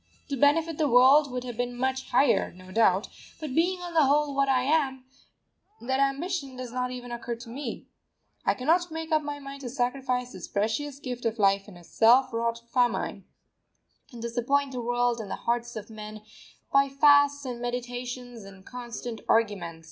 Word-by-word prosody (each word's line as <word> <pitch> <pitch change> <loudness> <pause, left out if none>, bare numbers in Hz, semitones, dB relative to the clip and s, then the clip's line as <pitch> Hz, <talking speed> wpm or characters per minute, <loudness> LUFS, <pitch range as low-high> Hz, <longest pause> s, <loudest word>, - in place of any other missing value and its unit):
To 280 - -1
benefit 300 +4 +2
the 305 - +3
world 260 +4 +6
would 250 0 -3
have 245 -2 -6
been 245 0 -2
much 260 +1 -1
higher, 275 -4 +3
no 185 +1 -14
doubt; 200 -2 +3 0.3
but 305 -5 -5
being 355 +4 +1
on 350 -1 -6
the 315 -3 +5
whole 290 +1 +2
what 275 0 +1
I 255 -1 +3
am, 270 -3 +1 0.7
that 265 +2 -1
ambition 275 +1 -1
does 255 -2 -7
not 250 0 -2
even 245 -1 -7
occur 235 0 -4
to 230 +1 -11
me. 275 +5 -6 0.6
I - - +2
cannot 340 +7 +2
make 320 +1 -6
up 310 -1 +3
my 290 -1 -5
mind 275 0 -9
to 250 - -5
sacrifice 250 0 -1
this 185 -2 -8
precious 225 +8 -2
gift 250 -3 -6
of 230 0 -1
life 195 -1 +2
in 195 -4 -12
a 175 - -15
self 245 +7 +4
wrought 230 0 -1
famine, 245 -2 0 0.9
and 240 - -10
disappoint 255 +4 0
the 250 -2 -4
world 245 0 +1
and 210 -3 -6
the - - -2
hearts 240 0 -1
of 215 0 -7
men 215 0 -9 0.5
by 275 0 +5
fasts 285 0 +4
and 245 -2 -5
meditations 245 -1 -5
and 195 -1 -14
constant 240 -2 -7
argument. 200 -7 +1
250 Hz, 185 wpm, -27 LUFS, 235-280 Hz, 0.9 s, world